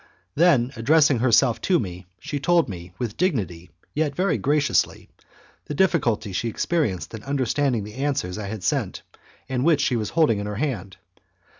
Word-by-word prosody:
Then 145 Hz, -, +3 dB
addressing 140 Hz, +2 st, +4 dB
herself 120 Hz, 0 st, +3 dB
to 185 Hz, -, +3 dB
me, 90 Hz, -, -5 dB
she 145 Hz, -, -5 dB
told 170 Hz, +4 st, +3 dB
me, 90 Hz, -2 st, -8 dB
with 120 Hz, -4 st, -4 dB
dignity 95 Hz, -, -1 dB, 0.2 s
yet 150 Hz, -2 st, -1 dB
very 185 Hz, +3 st, +1 dB
graciously, 145 Hz, 0 st, +1 dB, 0.6 s
the 150 Hz, -, -5 dB
difficulty 130 Hz, -, +1 dB
she 115 Hz, +5 st, -1 dB
experienced 115 Hz, -, -1 dB
in 110 Hz, -, -6 dB
understanding 135 Hz, -2 st, 0 dB
the 105 Hz, +1 st, -9 dB
answers 130 Hz, -9 st, -2 dB
I 105 Hz, -, -5 dB
had 105 Hz, -2 st, -6 dB
sent -, -, -1 dB, 0.4 s
and 130 Hz, -1 st, -1 dB
which 155 Hz, -2 st, +3 dB
she 130 Hz, -, +1 dB
was 110 Hz, -3 st, -2 dB
holding 150 Hz, -11 st, +2 dB
in 100 Hz, -, -4 dB
her 105 Hz, -, -4 dB
hand. 100 Hz, -8 st, -3 dB
125 Hz, 165 wpm, -24 LUFS, 105-150 Hz, 0.6 s, addressing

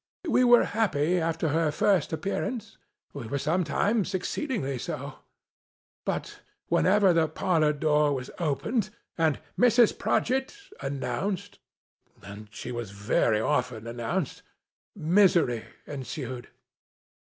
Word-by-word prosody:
We 255 Hz, -4 st, +4 dB
were 240 Hz, -1 st, +7 dB
happy 180 Hz, -6 st, +1 dB
after 165 Hz, -1 st, 0 dB
her 160 Hz, +1 st, +2 dB
first 180 Hz, +1 st, +2 dB
appearance; 200 Hz, -, -3 dB, 0.3 s
we 135 Hz, -6 st, -6 dB
were 140 Hz, -, -2 dB
sometimes 185 Hz, -, 0 dB
exceedingly 185 Hz, -, -2 dB
so. -, -, -6 dB, 0.9 s
But, -, -, -3 dB, 0.3 s
whenever 195 Hz, -1 st, +4 dB
the 165 Hz, -1 st, +3 dB
parlor 155 Hz, -3 st, +1 dB
door 150 Hz, 0 st, +2 dB
was 130 Hz, -1 st, -6 dB
opened, 190 Hz, -, 0 dB, 0.3 s
and 160 Hz, -3 st, +1 dB
" -, -, -14 dB
Mrs. 240 Hz, -1 st, +5 dB
Prodgit! 265 Hz, -, 0 dB
" 415 Hz, -, -17 dB
announced 180 Hz, +7 st, -3 dB, 0.6 s
(and 105 Hz, +1 st, -10 dB
she 120 Hz, +3 st, -7 dB
was 120 Hz, -3 st, -4 dB
very 105 Hz, +2 st, +1 dB
often 125 Hz, -4 st, -1 dB
announced), 125 Hz, +8 st, -3 dB, 0.5 s
misery 170 Hz, -, +3 dB, 0.2 s
ensued. 130 Hz, -3 st, -6 dB
160 Hz, 115 wpm, -27 LUFS, 135-200 Hz, 0.9 s, were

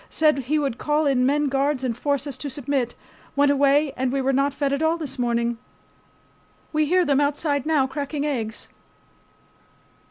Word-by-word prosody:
Said 305 Hz, -3 st, +2 dB
he 275 Hz, +4 st, 0 dB
would 275 Hz, -6 st, -2 dB
call 300 Hz, +1 st, +1 dB
in 260 Hz, -3 st, +2 dB
men 295 Hz, +1 st, +2 dB
guards 275 Hz, 0 st, 0 dB
and 245 Hz, -3 st, -1 dB
force 280 Hz, +2 st, -1 dB
us 285 Hz, -3 st, -5 dB
to 290 Hz, -, -4 dB
submit. 265 Hz, -2 st, -2 dB, 0.4 s
Went 285 Hz, 0 st, +4 dB
away 285 Hz, +1 st, +3 dB
and 255 Hz, -1 st, -1 dB
we 275 Hz, -, 0 dB
were 270 Hz, 0 st, +1 dB
not 275 Hz, +2 st, +2 dB
fed 280 Hz, 0 st, -1 dB
at 280 Hz, -, -1 dB
all 320 Hz, +1 st, +2 dB
this 305 Hz, -6 st, -6 dB
morning. 235 Hz, -1 st, 0 dB, 1.1 s
We 305 Hz, 0 st, +2 dB
hear 360 Hz, +2 st, +3 dB
them 285 Hz, -1 st, +2 dB
outside 285 Hz, 0 st, 0 dB
now 300 Hz, -4 st, +3 dB
cracking 285 Hz, +2 st, -3 dB
eggs. 230 Hz, -7 st, -3 dB
280 Hz, 180 wpm, -23 LUFS, 265-295 Hz, 1.1 s, Went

